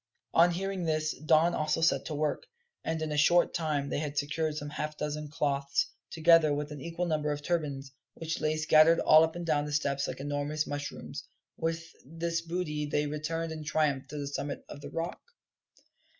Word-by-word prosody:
On 170 +1 +6
hearing 190 +1 -2
this 155 -1 0
Don 155 +4 +3
also 155 +1 0
set 165 - +3
to 155 - -4
work, 150 0 -1 0.4
and 160 0 -1
in 155 - -3
a 150 - -1
short 170 +4 +4
time 150 -4 -1
they - - -1
had 145 -1 -4
secured 150 +2 -1
some 145 -1 -5
half 150 0 -4
dozen 150 0 -3
cloths, 140 -2 0 0.2
together 165 -1 +5
with 150 +1 -4
an 145 -2 -7
equal 170 +4 -3
number 155 -3 0
of 145 0 -4
turbans, 145 -5 -2 0.2
which 160 -1 -4
lay 155 0 +1
scattered 155 +1 +6
all 155 +1 +7
up 160 +1 -1
and 175 0 -4
down 150 -3 +1
the 150 - -5
steps 140 -2 0
like - - -5
enormous 145 +2 -2
mushrooms. 145 0 -5 0.3
With 165 0 -2 0.2
this 165 +3 -2
booty 165 -3 -3
they 150 0 0
returned 160 +2 -3
in 155 -1 -6
triumph 150 -3 0
to 150 - -7
the 145 - -3
summit 140 0 -4
of 145 - -9
the - - -7
rock. 165 +1 -4
155 Hz, 195 wpm, -30 LUFS, 145-165 Hz, 0.4 s, all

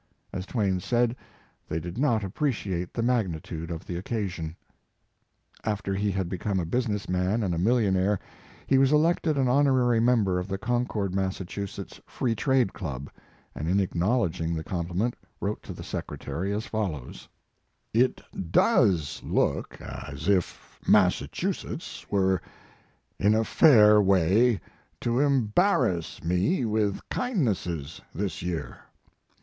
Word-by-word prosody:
As 95 +1 -4
Twain 100 -6 0
said: 120 +4 +1 0.5
"They 80 - -1
did 85 +7 -6
not 120 -7 +2
appreci 105 -1 -1
ate 90 0 -3
the 115 - -2
magnitude 85 -9 -1
of 80 -2 -5
the 90 - -4
occasion." 90 -5 -3 1.1
After 105 -2 -2
he 100 +2 0
had 95 -2 -1
become 95 +2 -2
a 85 - -1
business 105 +1 -1
man 90 +5 0
and 90 -3 0
a 85 - -1
millionaire 100 -2 +2 0.5
he 135 - +4
was 135 0 +4
elected 155 0 +3
an 135 -2 +2
honorary 130 -3 +3
member 110 -6 +3
of 90 - -4
the 95 -1 -2
Concord, 110 -4 -1
Mass., 95 -1 -1 0.7
Free 120 -3 -1
Trade 125 -2 +2
Club, 70 -7 -6 0.4
and 75 - -4
in 95 +3 +3
acknowledging 90 -3 0
the 80 - -3
compliment 90 +7 -2 0.2
wrote 105 +1 -2
to - - -9
the - - -8
secretary 95 +4 -4
as 105 +2 -2
follows: 90 - -4 0.6
It 125 +3 +2 0.3
does 95 - +3
look - - 0
as 75 +3 -7
if 95 -3 -1
Massachusetts - - 0
were 95 -3 +2 0.8
in 105 +2 +4
a 110 - +3
fair 105 -6 +6
way 100 +3 +3 0.4
to 120 +1 +1
embarrass 130 - +2
me 90 - +1
with 105 -2 -1
kind 245 - 0
nesses 85 - -3
this 95 -2 -3
year. 85 -2 -4
100 Hz, 135 wpm, -27 LUFS, 90-120 Hz, 1.1 s, fair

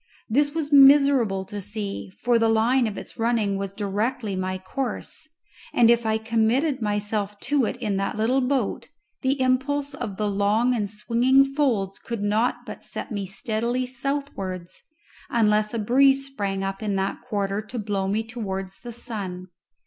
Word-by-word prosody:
This 290 +6 +1
was 300 -3 -2
miserable 275 -8 +6
to 205 +1 -6
see, 205 -1 -4
for 240 -1 +4
the 225 0 +3
line 235 +3 +3
of 210 - -5
its - - -9
running 225 -3 +1
was 195 0 -3
directly 205 +1 -2
my 185 0 -2
course, 245 +9 -4 0.5
and 235 -1 +6
if 235 -1 +2
I 220 0 +2
committed 230 +6 +1
myself 210 -1 -1
to 285 -4 +2
it - - -2
in 210 -5 -1
that 195 +2 -2
little 245 +5 +2
boat, 255 -3 -1 0.3
the 270 0 +1
impulse 275 +3 +1
of 225 -8 -5
the 210 - 0
long 205 +5 +2
and 210 -4 -1
swinging 240 +6 +3
folds 255 -9 0
could 230 -3 -5
not 215 +4 0
but - - -8
set - - -6
me 200 -3 -3
steadily 235 +5 -2
southwards, 250 -9 -4 0.5
unless 215 -2 +2
a 230 - -3
breeze 270 +5 +4
sprang 200 -8 -3
up 195 +1 -3
in 210 -2 -1
that 195 0 -2
quarter 205 -4 -2
to 215 +3 -8
blow 200 -3 -1
me 210 +3 0
towards 195 -4 -5
the 240 - -8
sun. 195 -6 -5
220 Hz, 165 wpm, -24 LUFS, 200-255 Hz, 0.5 s, miserable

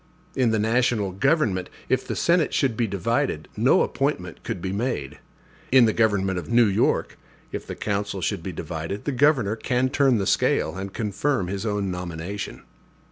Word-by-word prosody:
In 125 -3 +3
the 110 - +2
national 110 -2 +1
government, 105 - +1 0.2
if - - 0
the - - -2
Senate 170 -2 +2
should 130 -5 +1
be 115 0 0
divided, 100 - -1
no - - +4
appointment - - -2
could - - -4
be 95 +2 -3
made; 100 - -3 0.5
in 130 -2 +7
the 110 - +2
government 95 -5 +1
of 80 -2 -9
New 120 0 +5
York, 100 -2 +1 0.3
if - - -6
the - - -5
council 100 -1 -2
should 85 - -2
be - - -5
divided, 85 +4 -5
the 145 - 0
governor 130 -5 +3
can 125 +3 0
turn 135 -3 +3
the 100 - -1
scale, 80 -3 +1
and 95 +1 -5
confirm 105 0 -1
his 100 +3 -3
own 100 -2 -1
nomination. 90 +2 -5
105 Hz, 175 wpm, -24 LUFS, 95-125 Hz, 0.5 s, in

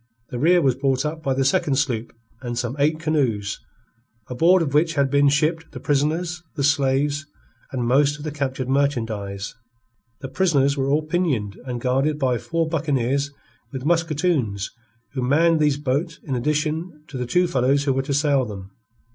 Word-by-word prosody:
The 120 - -4
rear 175 +4 +4
was 135 -2 +4
brought 135 +1 0
up 155 +1 -3
by 135 -4 0
the 135 0 +1
second 135 +1 +2
sloop 125 -5 -1 0.3
and 120 -2 -4
some 120 +1 -2
eight 155 +2 +2
canoes, 130 -11 -1 0.7
aboard 165 +8 +4
of 140 -3 -3
which 165 +2 +2
had 140 -2 +2
been 140 0 +4
shipped 160 +3 0
the - - -6
prisoners, 160 +4 0
the 140 - -2
slaves, 145 +1 +1 0.4
and 125 -3 -2
most 140 +4 +3
of 145 - -10
the 155 - -3
captured 135 -3 -3
merchandise. 115 -8 -1 0.7
The 135 - -5
prisoners 140 -4 +2
were 135 -1 -1
all 150 +2 +2
pinioned, 150 - -1
and 125 -1 -3
guarded 135 +5 +1
by 130 -5 +1
four 165 -1 -1
buccaneers 140 -3 0 0.4
with 130 -1 -6
musketoons 155 - 0 0.4
who 130 - -2
manned 160 +6 +3
these 150 -2 +2
boats 150 +4 -1
in 135 - -4
addition 150 +4 -2
to 145 - -10
the 125 -1 -3
two 180 +8 +3
fellows 135 -2 +2
who 140 -2 +1
were 135 - +1
to 140 +1 -3
sail 140 -2 +2
them. 100 -4 -8
140 Hz, 175 wpm, -23 LUFS, 130-155 Hz, 0.7 s, rear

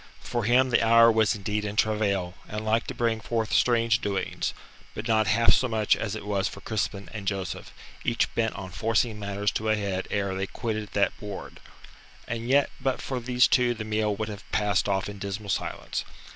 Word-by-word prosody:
For 120 - -2
him 125 +2 +4
the - - +4
hour 115 +1 +7
was 110 -2 +3
indeed 105 +1 -2
in 105 0 -4
travail 105 -5 +1 0.2
and 105 +1 -4
like 110 +2 +1
to - - -5
bring 115 -2 0
forth 115 -2 -2
strange 115 -2 +3
doings 100 -2 -2 0.4
but 105 - -4
not 110 -1 +3
half 115 +1 +5
so 130 - +3
much 110 -3 +2
as 110 - -3
it - - -7
was 100 -1 0
for 100 - -8
Crispin 100 -1 -3
and 105 -3 -6
Joseph, 95 -2 -3 0.3
each 115 - +1
bent 110 -1 0
upon 95 -1 -7
forcing 110 +2 0
matters 100 0 -1
to 110 0 -2
a 110 - +4
head 100 -3 -2
ere 100 -1 -1
they 95 +1 -2
quitted 110 -2 -4
that 100 -1 +2
board. 105 -2 -7 0.7
And 120 0 -4
yet 140 +1 +4
but 135 -2 0
for 130 -2 -3
these 125 +1 +3
two 125 -2 +3
the 110 - -5
meal 105 -1 0
would 110 +1 -3
have 100 -2 -7
passed 105 -2 +1
off 95 0 0
in 100 -1 -8
dismal 100 +1 -5
silence. - - -3
110 Hz, 200 wpm, -27 LUFS, 100-115 Hz, 0.7 s, hour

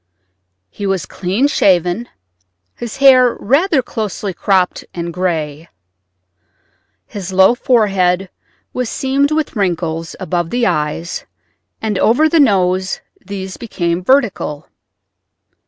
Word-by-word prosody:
He 200 - -4
was 190 -4 -1
clean 195 +8 -1
shaven, 185 - +1 0.6
his 235 -2 -7
hair 255 -3 +6
rather 280 - +2
closely 210 -4 -4
cropped 185 0 +1
and 170 -1 -4
gray. 160 -3 -3 1.4
His 195 -2 -7
low 190 +4 +5
forehead 195 -7 +1 0.4
was 250 -2 -2
seamed 275 +1 +1
with 310 -3 -1
wrinkles 165 -4 -2
above 175 -2 -2
the 245 +3 0
eyes, 165 0 -2 0.6
and 210 -3 -1
over 250 +11 +4
the 325 +1 +2
nose 185 -7 +2 0.2
these 190 -1 -6
became 175 -6 -2
vertical. 200 - +1
195 Hz, 105 wpm, -16 LUFS, 180-240 Hz, 1.4 s, hair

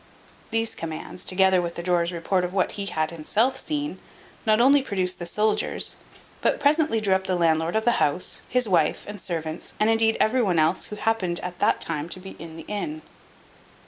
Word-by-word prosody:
These 225 0 0
commands, 165 +2 -6
together 190 -1 +4
with 170 -1 -4
the 170 - -5
drawer's 175 -1 +1
report 180 +2 0
of 180 +2 -4
what 190 - +1
he 200 -1 -4
had 155 -3 -1
himself 210 +11 0
seen, 295 -1 -3 0.5
not 215 0 +4
only 275 +3 +6
produced 185 -7 -2
the 175 - -3
soldiers, 210 +4 +1 0.5
but - - +1
presently 295 -4 +2
drew 200 -3 +1
up 190 0 0
the 185 - +1
landlord 165 0 +1
of 220 0 +1
the 240 - +2
house, 150 +5 0
his 250 -2 +2
wife, 165 -6 +1
and 205 -2 -7
servants, 160 -1 -5
and, 215 +1 +3
indeed, 225 0 +3
every 250 +4 +3
one 185 -7 +1
else 160 +3 +2
who 210 - -7
happened 205 -5 0
at 180 -1 -6
that - - +2
time 150 +3 -1
to 185 - -7
be 190 +1 -9
in 165 -1 -9
the 165 - -10
inn. 300 +10 -4
190 Hz, 200 wpm, -25 LUFS, 170-225 Hz, 0.5 s, only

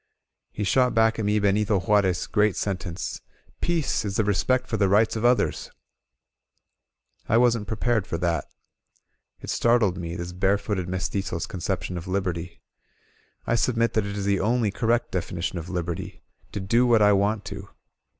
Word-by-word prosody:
He 105 - -4
shot 125 +5 +2
back 115 0 +3
at 110 - -1
me 105 +1 +2
Benito 100 0 +2
Juarez' 95 -1 +2
great 105 -2 +2
sentence: 95 -3 -4 0.4
"Peace 165 -8 0
is 100 -2 -3
the 110 - +2
respect 125 +5 +1
for 115 - -3
the 100 -2 +2
rights 105 +4 +3
of 110 - -3
others 120 +1 +1 0.8
!" - - -41
I 110 - +4
wasn't 120 -3 +2
prepared 110 -1 0
for 85 - -2
that. 85 -3 -1 1.0
It - - -5
startled 115 -6 +2
me, 85 -1 -5
this 85 0 -5
barefooted 95 0 0
mezt%zo*s 95 -2 -2
conception 90 -1 -3
of 85 - -10
Liberty. 90 -3 -3 0.8
I - - 0
submit 115 0 +1
that 110 -2 0
it 100 0 -5
is 100 - -3
the 100 -1 +2
only 115 0 +1
correct 120 +3 0
definition 90 -1 -3
of 85 - -8
Liberty 90 -1 -4
— - - -35
to - - -3
do 115 +6 +2
what 115 -3 +5
I 105 0 +6
want 100 +1 +1
to! 100 0 -9
100 Hz, 170 wpm, -25 LUFS, 90-110 Hz, 1.0 s, I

